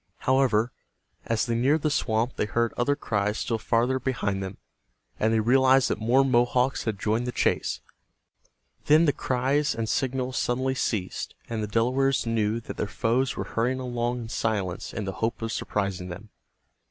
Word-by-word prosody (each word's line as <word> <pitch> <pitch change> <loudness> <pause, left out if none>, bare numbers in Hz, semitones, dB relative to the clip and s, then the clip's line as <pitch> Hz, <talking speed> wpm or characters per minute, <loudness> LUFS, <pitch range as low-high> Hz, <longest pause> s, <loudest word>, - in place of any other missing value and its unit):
However, 125 -3 +2 0.6
as 115 -1 +1
they 120 - -1
neared 135 +6 +2
the 155 - +2
swamp 115 -2 0
they - - -1
heard 115 +2 0
other 135 +4 +1
cries 105 -6 -1
still 115 -2 -1
farther 120 +4 +1
behind 105 -7 -1
them, 95 0 -6 0.6
and 110 - +2
they 115 - +3
realized 130 +3 +4
that - - -1
more 125 +5 +3
Mohawks 125 +1 +2
had 110 -3 -1
joined 110 +4 0
the - - -1
chase. - - 0 1.1
Then 155 +3 +6
the 145 - +3
cries 135 +5 0
and 115 -1 -2
signals 130 +2 -1
suddenly 130 +2 0
ceased, 105 -7 -2
and 115 -2 -3
the 105 - -2
Delawares 125 +6 +1
knew 115 -1 0
that - - -8
their - - -1
foes 115 +7 0
were - - -1
hurrying 125 +3 -1
along 120 -1 -2
in 115 - -7
silence 100 -6 -2
in 105 - -4
the 95 - -2
hope 115 +1 0
of 115 - -2
surprising 100 -5 -2
them. 100 +5 -9
120 Hz, 175 wpm, -26 LUFS, 110-130 Hz, 1.1 s, Then